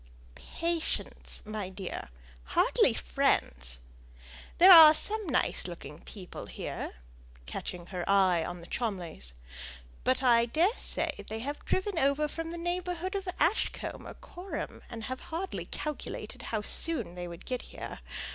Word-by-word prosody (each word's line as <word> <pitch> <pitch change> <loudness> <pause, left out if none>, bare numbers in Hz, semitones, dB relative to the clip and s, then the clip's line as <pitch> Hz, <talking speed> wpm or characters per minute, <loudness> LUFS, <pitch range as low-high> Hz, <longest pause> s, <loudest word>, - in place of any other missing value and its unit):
"Patients, 330 - -2
my 210 -3 -4
dear 190 -1 -6 0.4
hardly 65 - +3
friends. - - +1 0.8
There 370 +2 +9
are 320 -3 +12
some 425 +4 +2
nice 255 - +1
looking 170 -3 -8
people 190 -4 -9
here," - - -5 0.5
catching 175 - -5
her 180 -1 -4
eye 190 -4 +5
on 175 +1 -5
the - - -10
Cholmleys; 175 - -3 0.7
"but 260 +1 +2
I 235 -2 +5
daresay 345 - 0
they 220 +1 -3
have 285 +4 -4
driven 375 -2 0
over 280 +2 +3
from 330 +2 -5
the 340 - -5
neighbourhood 355 +1 -2
of 390 -1 -3
Ashcombe 340 +8 0
or - - -8
Coreham, 365 +2 -6
and 230 -2 -6
have 260 +3 -4
hardly 350 +4 -3
calculated 300 -2 -5
how 215 -2 -1
soon 320 - -2
they 175 0 -5
would 170 -1 -9
get 250 -1 -2
here. - - -8
255 Hz, 135 wpm, -30 LUFS, -, 0.8 s, are